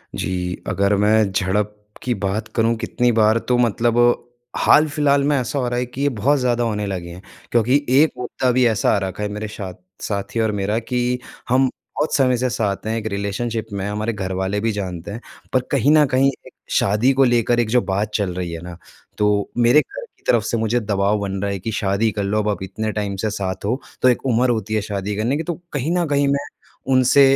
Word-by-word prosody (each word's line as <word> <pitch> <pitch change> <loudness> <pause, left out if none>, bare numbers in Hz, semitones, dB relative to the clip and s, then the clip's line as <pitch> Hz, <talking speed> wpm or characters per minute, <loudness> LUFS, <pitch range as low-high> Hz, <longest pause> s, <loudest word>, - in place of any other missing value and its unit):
जी, 90 -1 -2
अगर 100 +1 +2
मैं 105 0 +3
झड़प 100 +2 0 0.3
की 125 - 0
बात 100 +3 -2
करूँ 115 +1 +2
कितनी 120 +2 0
बार 110 0 +4
तो 125 -1 +3
मतलब 120 0 +2 0.6
हाल-फिलहाल 145 -2 +4
में 145 0 +2
ऐसा 130 +3 -2
हो 125 - 0
रहा 120 0 -1
है 125 - -1
कि 125 +3 -7
ये 145 - +3
बहुत 140 +7 +2
ज़्यादा 120 -1 +1
होने 105 -2 -1
लगे 90 -3 -4
हैं। 90 +2 -10 0.3
क्योंकि 125 +5 +3
एक 145 +5 +5
मुद्दा 125 +1 -1
भी 125 0 +3
ऐसा 110 -3 +2
आ - - +2
रखा 95 +3 -5
है, 105 - -1
मेरे 105 +1 -4
साथ 100 -3 -7 0.3
साथी 100 +2 -3
और 110 -1 +2
मेरा 105 +2 -1
कि 125 +1 -1 0.3
हम 130 +1 +4 0.3
बहुत 150 - 0
समय 130 -3 +3
से 125 +1 0
साथ 110 -4 -2
हैं 110 - -1
एक 110 - -5
रिलेशनशिप 105 +3 -3
में 100 -1 -3
हमारे 105 +2 -2
घरवाले 95 0 -2
भी 115 +1 0
जानते 95 -2 -5
हैं। 115 +4 -6 0.3
पर 130 - +3
कहीं 140 +1 +3
न 150 - +6
कहीं 135 +1 +4 0.2
एक - - -15 0.3
शादी 105 +6 +2
को 135 +1 +4
लेकर 120 -1 +2
एक 115 - +1
जो 125 +1 +3
बात 100 +2 -2
चल 100 -4 0
रही 90 -1 -4
है 85 - -6
ना, 90 -1 -9 0.4
तो 105 -1 +1
मेरे 120 +5 +5
घर - - -9
की - - -34
तरफ - - +2
से 115 - -1
मुझे 115 +2 +1
दबाव 100 -1 0
बन 100 -1 -3
रहा 100 -1 -1
है 100 - -3
कि 110 +5 -4
शादी 105 +1 0
कर 100 -1 -3
लो 105 +2 0
अब, 105 0 0
आप 100 - -2
इतने 110 +3 -3
टाइम 105 -2 -3
से - - +1
साथ 100 -2 -4
हो, 125 +6 -1 0.2
तो 130 - +6
एक 125 - 0
उम्र 125 0 +2
होती 110 -2 -1
है 110 - +1
शादी 100 0 -3
करने 120 +7 0
की, 165 - -2
तो 175 - -2 0.2
कहीं 145 +3 -1
न 175 - +1
कहीं 145 -1 +2
मैं 140 +1 0 0.5
उनसे 130 +2 +5
110 Hz, 225 wpm, -21 LUFS, 100-125 Hz, 0.6 s, न